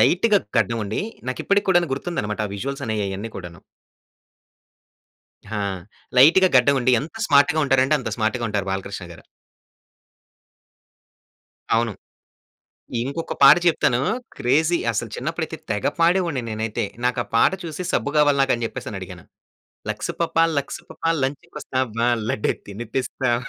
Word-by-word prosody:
లైట్‌గా 205 +4 +4 0.2
గడ్డం 115 -1 +1
ఉండి, 105 +2 -3 0.3
నాకు 130 - -3
ఇప్పటికి 200 0 +2
కూడాను 175 -4 +3
గుర్తుందన్నమాట, 120 -9 -3
ఆ - - -8
విజువల్స్ 135 +7 -4
అనేయి 110 -1 -1
అ‌యన్నీ 100 +4 -5
కూడాను. 85 -3 -9 2.0
ఆ! - - -1 0.6
లైట్‌గా 170 +8 +7
గడ్డం 140 +3 +5
ఉండి 125 - +2
ఎంత 165 +10 -9
స్మార్ట్‌గా 145 +1 +4
ఉంటారంటే 135 +1 +3
అంత 125 - -4
స్మార్ట్‌గా 110 +2 0
ఉంటారు 100 -2 -2
బాలకృష్ణ 95 -1 -4
గారు. - - -14 2.5
అవును. 115 -1 +1 1.1
ఇంకొక 140 +6 -4
పాట 140 +3 +10
చెప్తాను 125 -7 +3 0.4
క్రేజీ 155 +7 +2
అసలు 105 - -3
చిన్నప్పుడైతే - - -3
తెగ 105 -1 -1
పాడేవాడిని 170 -5 +2
నేనైతే. 110 0 -2 0.2
నాకా 125 0 +1
పాట 115 - +5
చూసి 165 +1 -5
సబ్బు 145 - 0
కావాలి 145 -2 +4
నాకని 120 -3 +1
చెప్పేసని - - -6
అడిగాను. - - -9 0.7
లక్స్ - - -3
పాపా 165 -1 +2
లక్స్ 140 - -3
పాపా 165 - -2
లంచ్ 135 +2 -2
కోస్తావా? 130 -5 -2 0.2
లడ్డే 105 - 0
తినిపిస్తావా? 120 +3 -2
130 Hz, 130 wpm, -22 LUFS, 110-155 Hz, 2.5 s, పాట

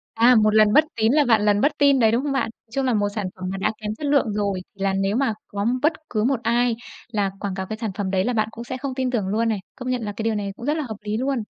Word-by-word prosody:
À, 240 +2 +6
một 215 0 +3
lần 215 -1 +5
bất 305 +6 +6
tín 220 +2 +3
là 300 -1 +4
vạn 225 -4 +3
lần 205 0 +3
bất 290 - +3
tin 280 -2 +5
đấy, 220 -2 +4
đúng 240 - +1
không 285 -1 -1
bạn? 270 -4 0 0.2
Chung 270 +2 0
là 250 - +2
một 205 -1 +1
sản 205 -4 -2
phẩm 185 - -8
mà 195 - -3
đã 195 - 0
kém 210 0 -3
chất 295 - -3
lượng 280 -7 +2
rồi, 200 -3 -1
thì 195 - -9
là 195 -1 +2
nếu 195 +3 0
mà 255 -5 +1
có 200 +1 -3 0.2
bất 310 +2 +4 0.2
cứ 215 -1 0
một 260 -2 +1
ai 235 0 +2 0.4
là 200 -2 0
quảng 200 -2 -3
cáo 190 -1 -4
cái 220 +2 -5
sản 220 -3 -2
phẩm 190 -2 -1
đấy 190 -1 +1
là 250 - 0
bạn 220 -1 +1
cũng 230 +1 -8
sẽ 255 +2 -5
không 270 0 -4
tin 260 -1 -1
tưởng 210 -6 -1
luôn 225 +3 +1
này. 215 - 0 0.2
Công 255 -1 -4
nhận 250 -2 -1
là 205 -1 -3
cái - - -3
điều 225 0 0
này 200 -1 -3
cũng 240 - -8
rất 300 +2 +1
là 310 - -1
hợp 220 - -5
lý 210 +1 -2
luôn. 260 -1 -1
225 Hz, 325 wpm, -23 LUFS, 205-255 Hz, 0.4 s, À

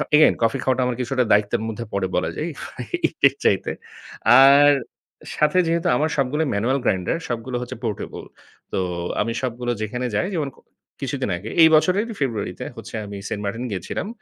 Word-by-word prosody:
Again 155 - +6
coffee 115 +4 +2
খাওয়াটা 130 -1 +1
আমার 125 - -1
কিছুটা 125 +1 +1
দায়িত্বের 105 +2 +3
মধ্যে 115 +1 -5
পরে 100 -1 0
বলা - - 0
যায়, - - -2
ইফ - - -13 0.7
এর - - -3
চাইতে। - - +2 0.7
আর 140 +2 +8 0.6
সাথে 155 +4 +2
যেহেতু 170 0 0
আমার 155 +3 +1
সবগুলো 140 +4 +1
ম্যানুয়াল 120 +7 +1
গ্রাইন্ডার 95 - 0
সবগুলো 120 +2 -3
হচ্ছে 125 +1 -6
পোর্টেবল, 105 -3 -4 0.5
তো - - -2 0.4
আমি 115 - -1
সবগুলো 120 -1 -2
যেখানে 125 +4 -3
যাই, 105 - +1
যেমন 145 -4 -1
কো - - -22 0.4
কিছুদিন 135 -4 -2
আগে 105 +5 -8
এই 160 - +9
বছরেরই 195 +8 +2
ফেব্রুয়ারিতে 115 -7 -2
হচ্ছে - - -8
আমি 100 0 -7
সেন্ট 105 - -4
মার্টিন 115 +5 -3
গিয়েছিলাম। 95 - -4
125 Hz, 170 wpm, -22 LUFS, 110-140 Hz, 0.7 s, এই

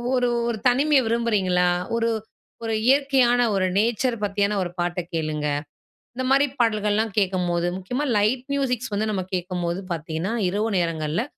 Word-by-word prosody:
ஒரு 250 -1 +2 0.2
ஒரு 235 -2 -1
தனிமைய 275 +3 +4
விரும்புறீங்களா? 200 -6 +1 0.3
ஒரு 230 0 +1 0.5
ஒரு 225 -1 -1
இயற்கையான 265 -3 +4 0.2
ஒரு 190 - +2
நேச்சர் 235 +3 +1
பத்தியான 200 0 0
ஒரு 175 - -4
பாட்ட 175 +1 -1
கேளுங்க. 155 -2 -2 0.7
இந்தமாரி 270 +3 +3
பாடல்கள்லாம் 215 -1 +1
கேட்கும்போது 180 -3 0
முக்கியமா 245 +10 -3
லைட் 225 +5 +1
மியூசிக்ஸ் 255 -4 -1
வந்து 215 +2 0
நம்ம 190 -3 -1
கேட்கும்போது 180 -1 -2
பார்த்தீங்கன்னா, 165 +5 -3 0.2
இரவு 210 +4 -1
நேரங்கள்ல 165 +2 -1
210 Hz, 130 wpm, -23 LUFS, 180-245 Hz, 0.7 s, தனிமைய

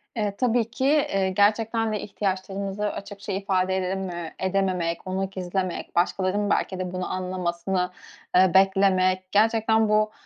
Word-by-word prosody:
Eee, 210 -3 -1
tabii 240 -1 +1
ki. 260 - -2
Eee, 235 -10 +2
gerçekten 220 +3 +2
de 210 - -1
ihtiyaçlarımızı 195 +1 -3
açıkça 200 0 -7
ifade 190 -1 0
edememe 185 -3 -3
edememek, 185 -3 -1
onu 190 +1 -2
gizlemek, 185 -1 -4
başkalarının 190 +3 +1
belki 190 -1 0
de 180 -1 -3
bunu 185 0 -3
anlamasını, 180 0 -2 0.4
eee, 185 -1 +5
beklemek, 190 -1 +3
gerçekten 220 +1 +3
bu, 215 0 +3
195 Hz, 130 wpm, -25 LUFS, 185-210 Hz, 0.4 s, eee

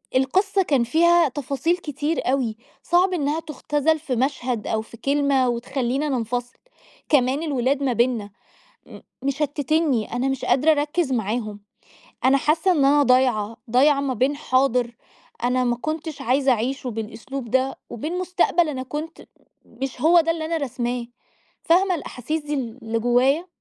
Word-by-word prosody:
القصّة 380 +10 +2
كان 275 -8 +2
فيها 335 +6 +4
تفاصيل 285 +6 -1
كتير 295 -3 -2
أوي، 240 -5 -1 0.3
صعب 360 +2 +2
إنّها 300 -2 0
تُختزَل 305 0 -1
في 280 -5 -3
مشهد 250 -3 -1
أو 220 0 0
في 230 +1 -13
كلمة، 275 -1 +1
وتخَلّينا 260 +4 -2
ننفَصِل. 245 -1 -3 0.5
كمان 275 +1 +2
الولاد 275 -1 0
ما 260 -3 +1
بيننا 235 -3 0 0.6
م - - -12 0.2
مشتتينني، 285 -2 0
أنا 250 +3 0
مش 270 -1 -2
قادرة 295 +4 +3
أَركز 295 0 0
معاهم. 215 -2 -2 0.6
أنا 265 +1 +5
حاسّة 320 +7 +2
إن 290 -6 +2
أنا 290 +1 +5
ضايعة، 245 -4 +2
ضايعة 275 +4 +4
ما 275 -2 -1
بين 260 +5 +1
حاضر 255 -4 +1 0.5
أنا 250 +1 +2
ما 240 -1 +1
كُنتش 310 +3 -5
عايزة 265 +2 +2
أَعِيشه 250 +2 -2
بالأسلوب 230 +3 -6
ده، 260 +2 +1
وبين 310 +10 -4
مستقبل 350 -2 +1
أنا 260 -3 -3
كُنت 300 +5 -6
م - - -19 0.6
مش 270 -2 -4
هو 340 +2 +6
ده 330 0 0
اللي 325 -1 -2
أنا 330 +1 -1
راسماه. 245 -4 -3 0.6
فاهمة 365 +3 +3
الأحاسيس 305 0 -4
دي 295 0 -4
ال 250 -3 -4
اللي 225 +1 -1
جُوّايا؟ 255 +8 +2
270 Hz, 155 wpm, -23 LUFS, 245-310 Hz, 0.6 s, هو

